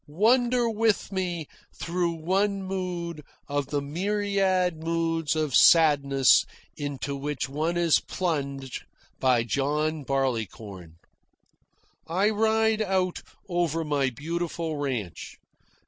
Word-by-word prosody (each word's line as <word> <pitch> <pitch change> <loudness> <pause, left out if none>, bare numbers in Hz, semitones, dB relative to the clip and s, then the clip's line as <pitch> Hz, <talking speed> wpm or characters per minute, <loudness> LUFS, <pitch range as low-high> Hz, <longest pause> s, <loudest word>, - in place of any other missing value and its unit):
Wander 240 - +3
with 220 -2 +1
me 180 -4 -2 0.3
through 170 0 -1
one 195 +5 0
mood 180 -4 -4 0.3
of 145 -1 -2
the 145 0 -2
myriad 185 0 0
moods 165 -2 0
of 155 -4 -1
sadness 140 -5 +5 0.3
into 140 -1 -4
which 140 -2 -3
one 155 +5 -2
is 170 -2 +4
plunged 140 -7 -3 0.4
by 125 -3 +3
John 150 +5 -1
Barleycorn. 110 - -3 1.1
I 190 +6 +2
ride 220 0 +2
out 190 -3 0 0.3
over 170 -3 0
my 145 -3 0
beautiful 165 +4 -4
ranch. 120 - -4
165 Hz, 100 wpm, -26 LUFS, 140-185 Hz, 1.1 s, sadness